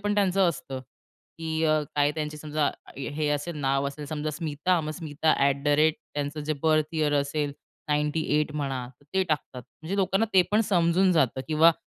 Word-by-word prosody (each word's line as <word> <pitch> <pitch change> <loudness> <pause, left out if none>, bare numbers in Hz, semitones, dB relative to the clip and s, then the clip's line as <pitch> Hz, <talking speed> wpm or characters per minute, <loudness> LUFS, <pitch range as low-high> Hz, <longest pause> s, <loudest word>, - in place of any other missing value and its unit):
पण 205 0 0
त्यांचं 195 -2 +3
असतं 135 -5 -4 0.6
की 160 0 -1
अ, 155 0 +3 0.2
काय 145 0 +4
त्यांची 150 -1 -4
समजा, 150 -1 0 0.3
हे 145 +2 -2
असेल, 150 +3 -2
नाव 135 0 +1
असेल, 145 +2 -8
समजा 155 0 -3
स्मिता, 155 +3 0
मग 155 -1 -4
स्मिता 155 -1 0
ॲट 140 0 +1
द - - +2
रेट, 155 0 +4 0.2
त्यांचं 145 +1 -3
जे 155 - 0
बर्थ 155 -1 +3
यिअर 155 -2 +1
असेल 145 +1 0 0.4
98 150 0 +1
म्हणा, 135 -4 -2
तर - - -23
ते 190 - +4
टाकतात. 150 -6 -3 0.2
म्हणजे 180 +5 -3
लोकांना 195 +3 +2
ते 185 - +8
पण 210 +2 +4
समजून 180 +1 +4
जातं. 135 -6 +2
किंवा 160 +2 +6
155 Hz, 180 wpm, -27 LUFS, 145-165 Hz, 0.6 s, ते